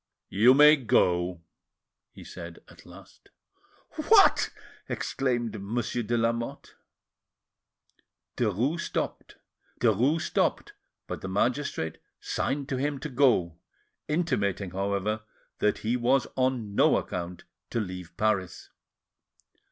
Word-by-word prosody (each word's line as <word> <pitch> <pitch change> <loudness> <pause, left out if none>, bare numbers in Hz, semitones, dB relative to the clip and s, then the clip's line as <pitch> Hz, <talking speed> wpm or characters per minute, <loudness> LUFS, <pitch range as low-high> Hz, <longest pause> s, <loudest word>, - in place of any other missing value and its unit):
"You 115 +7 +6
may 150 +2 +8
go," 90 -8 +1 0.7
he - - -13
said 85 0 -9
at - - -17
last. - - -16 0.8
"What!" - - +6 0.4
exclaimed 120 -5 -2
Monsieur 120 +4 -2
de 120 +1 -1
Lamotte. 115 0 -2 1.6
Derues 120 - 0
stopped, - - -4 1.7
but - - -6
the - - -5
magistrate 105 - -1 0.2
signed 140 0 -2
to 130 - -1
him 145 +2 -1
to 150 - -5
go, 120 - +2 0.5
intimating, 105 - -1
however, 100 +3 -1 0.4
that 105 - +2
he 115 +3 +1
was 125 +2 +2
on 130 -5 -1
no - - +4
account 90 0 -5 0.3
to 115 - -1
leave 90 -4 -6
Paris. 100 -5 -1
115 Hz, 100 wpm, -27 LUFS, 95-130 Hz, 1.7 s, may